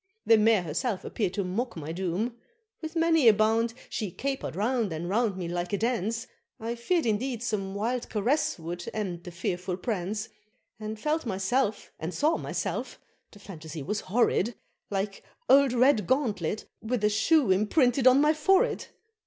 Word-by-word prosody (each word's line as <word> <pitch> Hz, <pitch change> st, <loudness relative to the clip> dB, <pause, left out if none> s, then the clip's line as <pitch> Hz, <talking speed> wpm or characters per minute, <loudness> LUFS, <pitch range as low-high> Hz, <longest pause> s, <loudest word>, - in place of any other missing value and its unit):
the 230 Hz, -, +7 dB
Mare 215 Hz, -3 st, +4 dB
herself 185 Hz, -, -2 dB
appeared 195 Hz, -5 st, -2 dB
to 200 Hz, -, 0 dB
mock 210 Hz, +5 st, -3 dB
my 155 Hz, 0 st, -5 dB
doom; 190 Hz, +7 st, -2 dB, 0.5 s
With 320 Hz, +1 st, -6 dB
many 325 Hz, -5 st, +4 dB
a 225 Hz, -, +9 dB
bound 225 Hz, +2 st, +2 dB
she 210 Hz, -4 st, -3 dB
caper'd 270 Hz, -, -4 dB
round 225 Hz, 0 st, 0 dB
and 160 Hz, +2 st, -4 dB
round 210 Hz, 0 st, +1 dB
me 180 Hz, -2 st, -3 dB
like 175 Hz, +2 st, -3 dB
a -, -, +2 dB
dance, 230 Hz, +1 st, -1 dB, 0.3 s
I 230 Hz, +1 st, -3 dB
feared 305 Hz, +8 st, 0 dB
indeed 230 Hz, +2 st, -1 dB
some 200 Hz, -4 st, -2 dB
wild 235 Hz, +4 st, -2 dB
caress 285 Hz, +9 st, +1 dB
would 175 Hz, +1 st, -6 dB
end 185 Hz, -5 st, -3 dB
the -, -, -7 dB
fearful 180 Hz, +1 st, -3 dB
prance, 205 Hz, +1 st, -3 dB, 0.5 s
And 215 Hz, 0 st, -5 dB
felt 305 Hz, +2 st, -1 dB
myself, 210 Hz, +4 st, 0 dB
and 165 Hz, +3 st, -4 dB
saw 310 Hz, +3 st, +2 dB
myself -, -, -4 dB, 0.3 s
the -, -, -15 dB
phantasy 160 Hz, -6 st, -8 dB
was 205 Hz, +7 st, -2 dB
horrid! 230 Hz, +1 st, +1 dB, 0.3 s
Like 195 Hz, 0 st, -3 dB, 0.2 s
old 275 Hz, -1 st, +6 dB
Redgauntlet, 235 Hz, -, +2 dB, 0.2 s
with 225 Hz, -1 st, -2 dB
a 210 Hz, -, +5 dB
shoe 235 Hz, -, +3 dB
imprinted 245 Hz, -, +3 dB
on 255 Hz, +2 st, +7 dB
my 300 Hz, +1 st, +4 dB
forehead! 385 Hz, +10 st, +2 dB
215 Hz, 160 wpm, -28 LUFS, 190-250 Hz, 0.5 s, a